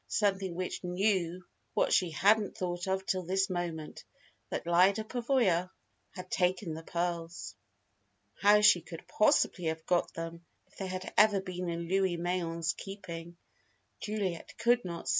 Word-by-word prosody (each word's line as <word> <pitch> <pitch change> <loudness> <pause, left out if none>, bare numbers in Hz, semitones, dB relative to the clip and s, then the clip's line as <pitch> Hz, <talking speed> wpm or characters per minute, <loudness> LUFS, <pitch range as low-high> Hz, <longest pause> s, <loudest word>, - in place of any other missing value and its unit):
Something 195 -4 0
which 185 +1 -4
knew 180 -1 0 0.3
what - - +2
she 180 - +3
hadn't 205 +6 +2
thought 180 -2 -3
of 190 0 -1
till 185 -1 0
this 190 +2 0
moment: 170 -3 -4 0.5
that - - -3
Lyda 185 +5 +4
Pavoya 225 -7 +1 0.5
had 185 0 -8
taken 180 -2 0
the 160 - -6
pearls. 170 0 -3 0.9
How 210 +1 +6
she 195 -4 +6
could 165 0 -10
possibly 190 -4 +2
have 160 0 -2
got 175 -1 +1
them, 165 +1 -6 0.2
if - - -26
they 195 - -4
had 185 0 -5
ever 210 -2 +6
been 180 -2 -4
in 170 0 -3
Louis 190 -1 +1
Mayen's 170 -1 -1
keeping, 170 -4 -8 0.6
Juliet 200 -5 -3
could 240 +1 +3
not 170 -2 -6
see. - - 0
180 Hz, 150 wpm, -31 LUFS, 170-195 Hz, 0.9 s, How